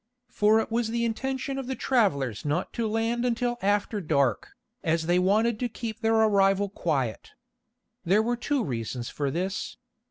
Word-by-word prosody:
For 215 +1 +4
it 225 - -3
was 235 0 +1
the 235 +1 -1
intention 265 +3 -2
of 265 - -6
the 265 - -2
travelers 140 - +1
not 150 +5 -2
to 230 -2 -1
land 225 +2 0
until 240 0 0
after 205 +1 0
dark, 140 - 0 0.3
as 160 0 +1
they 175 +2 +3
wanted 215 +4 +2
to 245 - -1
keep 225 -1 -6
their 225 -1 +2
arrival 200 -2 +3
quiet. 135 - -2 0.7
There 200 +5 +3
were 240 +2 0
two 265 +2 -1
reasons 120 -2 -4
for 145 -2 -2
this. 185 +6 -3
215 Hz, 165 wpm, -27 LUFS, 170-235 Hz, 0.7 s, For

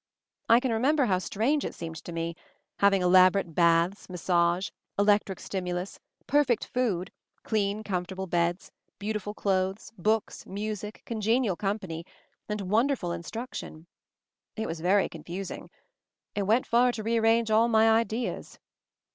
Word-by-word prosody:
I 230 +1 +7
can 255 -1 -1
re 225 - 0
member 280 +3 +3
how 185 -4 +2
strange 245 +10 0
it - - -5
seemed 165 -1 -6
to - - -6
me, 165 0 -3 0.4
having 195 -2 +4
elaborate 185 -1 +5
baths, 170 +4 +2
massage, 175 0 +1 0.3
electric 205 -2 +2
stimulus, 180 0 -4 0.3
perfect 275 -4 +2
food, 205 -8 -1 0.3
clean 210 -1 -1
comfortable 190 -1 -3
beds, 175 0 -1 0.3
beauti 210 +1 -2
ful 205 +2 -6
clothes, 190 +1 -1
books, 215 +3 0
music, 210 +1 -5
congenial 225 -2 +1
company, 190 -4 -3 0.5
and 210 -1 -2
wonderful 215 0 +1
instruction. 170 -2 -6 0.7
It 220 - -3
was 165 -3 -4
very 190 +3 +3
con - - -11
fusing. 185 +3 -6 0.6
It 200 -2 -2
went 230 +4 +3
far 245 +2 +4
to 220 - -5
rearrange 225 0 +2
all 225 +2 +5
my 220 -1 +4
ideas." 230 +1 -1
200 Hz, 140 wpm, -28 LUFS, 180-225 Hz, 0.7 s, I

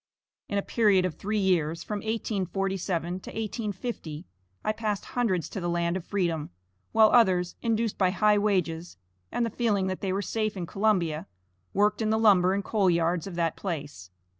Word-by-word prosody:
In 200 - -1
a 200 - 0
period 205 -5 +3
of 180 - -1
three 210 +7 -3
years 170 -5 +1
from 210 - -3
1847 195 -4 -2
to - - -10
1850, 210 -7 -4 0.4
I - - +3
passed 215 -2 -2
hundreds 195 -9 0
to 195 - -5
the 175 - -1
land 170 0 0
of 185 - -3
freedom, 170 -6 -1 0.4
while 220 -1 +6
others, 185 -7 +4
induced 230 -2 0
by 185 -2 +4
high 210 +3 +3
wages, 175 - -1 0.3
and 240 - 0
the 230 - -3
feeling 210 -4 +1
that 185 0 -3
they 195 - -1
were 195 +2 -1
safe 215 -2 -2
in 175 - -3
Columbia, 180 -4 0 0.4
worked 210 +2 +2
in 215 - +1
the 220 - +2
lumber 195 -4 +5
and 200 - -1
coal 200 -4 +2
yards 170 0 +1
of 185 - -7
that 165 -1 0
place. 145 - -5
195 Hz, 180 wpm, -27 LUFS, 175-215 Hz, 0.4 s, while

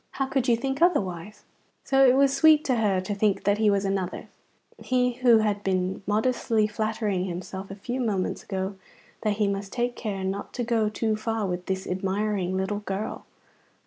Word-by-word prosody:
How 270 - -1
could 265 -1 -1
you 235 -2 +4
think 270 +4 -3
otherwise?" 210 - 0 0.4
So 270 0 +3
it 250 - +5
was 275 0 +4
sweet 315 -1 +5
to 255 -5 +1
her 205 -4 +2
to 185 +3 -3
think 205 0 +1
that 205 +1 +2
he 215 -1 +4
was 200 -1 +1
another's! 195 -2 -2 0.5
He 250 -1 +1
who 245 -3 +6
had 210 -2 0
been 185 0 -1
modestly 220 0 +1
flattering 210 -3 -1
himself 190 +2 -6
a 195 - -7
few 240 +6 -4
moments 200 -6 -1
ago 190 0 -4 0.4
that 215 - +1
he 210 -2 +2
must 200 0 -3
take 245 0 -1
care 200 -4 -4
not 195 +1 -4
to 245 - -2
go 225 -2 +1
too 215 +1 -1
far 220 0 -2
with 180 -1 -4
this 190 0 -2
admiring 190 0 -1
little 190 +2 -1
girl! 205 +1 -5
210 Hz, 185 wpm, -26 LUFS, 195-235 Hz, 0.5 s, who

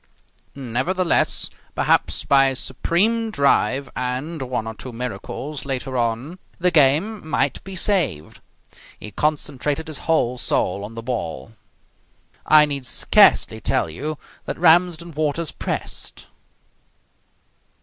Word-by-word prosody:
Nevertheless, 140 +8 0 0.2
perhaps, - - +1
by 135 -1 +5
a 135 - -1
supreme 210 - 0
drive, 140 - +2
and 130 +6 -3
one 125 -3 -3
or 115 - -5
two 125 +3 -8
miracles 125 +5 -5
later 135 -1 -3
on, 120 +8 -2 0.2
the 180 +1 +2
game 160 +6 +2
might - - 0
be 195 0 -8
saved. 165 - 0 0.6
He 105 - -8
concentrated 150 +3 -1
his 155 -4 -7
whole 125 -6 +2
soul 95 -3 0
on 110 +2 -8
the 115 - -6
ball. 110 - -4 1.0
I 155 -1 +7
need 140 -3 -4
scarcely - - +4
tell - - 0
you 150 - -4 0.3
that - - -4
Ramsden 170 0 +3
Waters 155 +1 -1
pressed.... - - -4
140 Hz, 120 wpm, -22 LUFS, 125-165 Hz, 1.0 s, I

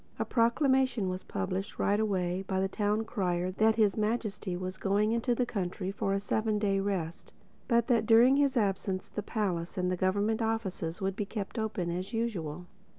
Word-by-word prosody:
A - - -1
proclamation 250 -3 +2
was 185 +1 -3
published 195 -1 -4
right 205 +1 +2
away 185 -4 0
by 190 -1 0
the 190 - +1
Town 210 +2 0
Crier 185 -5 -1
that 220 +3 +3
His 215 -3 +3
Majesty 210 -4 -2
was 185 0 -4
going 205 +2 +1
into 235 +1 +1
the 250 - +1
country 190 -3 -3
for 195 0 -2
a - - +1
seven 215 +1 0
day 200 -2 +1
rest, 185 -5 -3 0.3
but 235 -2 +3
that 230 -4 +2
during 240 +4 +6
his 280 -2 +2
absence 195 -3 0
the 210 - -4
palace 190 -6 -2
and 180 0 0
the - - +1
government 205 +5 +1
offices 210 -6 -2
would 195 0 -1
be 210 - -2
kept 210 +2 -5
open 205 -6 -2
as 185 +5 -4
usual. 180 -8 -3
205 Hz, 185 wpm, -30 LUFS, 185-225 Hz, 0.3 s, during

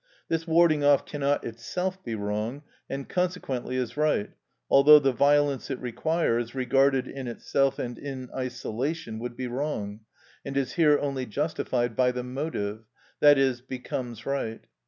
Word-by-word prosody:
This 165 0 -1
warding 160 -2 +4
off 145 -1 +4
cannot 145 -1 -1
itself 180 +12 -4
be 115 -2 -3
wrong, 105 +6 -3 0.3
and 135 0 -4
consequently 175 -9 -2
is 125 -3 -2
right, 150 -9 +1 0.4
although 145 +2 +8
the 135 -2 +3
violence 140 +1 +2
it 135 - -3
requires, 120 -2 -1
regarded 135 0 +2
in 135 -2 -6
itself 135 +3 0
and 120 -2 -5
in 135 -3 -6
isolation, 125 0 -3
would 120 +1 -6
be 130 - -3
wrong, 120 -5 -3 0.4
and 135 0 -4
is 135 -2 -1
here 150 -4 +5
only 135 -3 -2
justified 120 -2 -1
by 125 +1 +3
the 125 0 -4
motive, 125 -5 -4 0.4
i.e., 135 -3 +6
becomes 125 -2 -5
right. 135 -5 -2
135 Hz, 145 wpm, -27 LUFS, 120-145 Hz, 0.4 s, although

